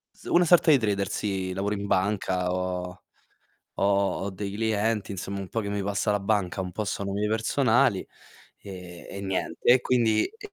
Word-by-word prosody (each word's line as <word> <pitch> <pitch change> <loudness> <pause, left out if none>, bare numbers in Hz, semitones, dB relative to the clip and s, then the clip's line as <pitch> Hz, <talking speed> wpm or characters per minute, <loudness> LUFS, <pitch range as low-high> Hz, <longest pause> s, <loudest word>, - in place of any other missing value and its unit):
S - - -19
una 175 +1 +4
sorta 170 -1 +5
di 145 - +7
trader, 100 -5 -1
sì. 95 -3 -2
Lavoro 100 +2 -1
in 100 0 -4
banca, 95 -2 0
ho 90 -1 -3 0.7
ho - - -1 0.4
ho - - -2
dei 100 +1 -5
clienti 110 -1 0
insomma, 100 +1 -5
un 95 -1 -6
po' 115 - -2
che 100 - -4
mi 100 0 -2
passa 100 +2 0
la 105 - +1
banca, 100 -2 0
un 90 -1 -4
po' 110 - -3
sono 100 -1 -3
miei 105 +1 -1
personali, 115 0 +2 0.6
e 90 -3 -10
e 100 - -6
niente. 95 -1 -3
E 125 - +5
quindi 115 -4 +2
e 420 -2 -11
100 Hz, 190 wpm, -26 LUFS, 95-110 Hz, 0.7 s, di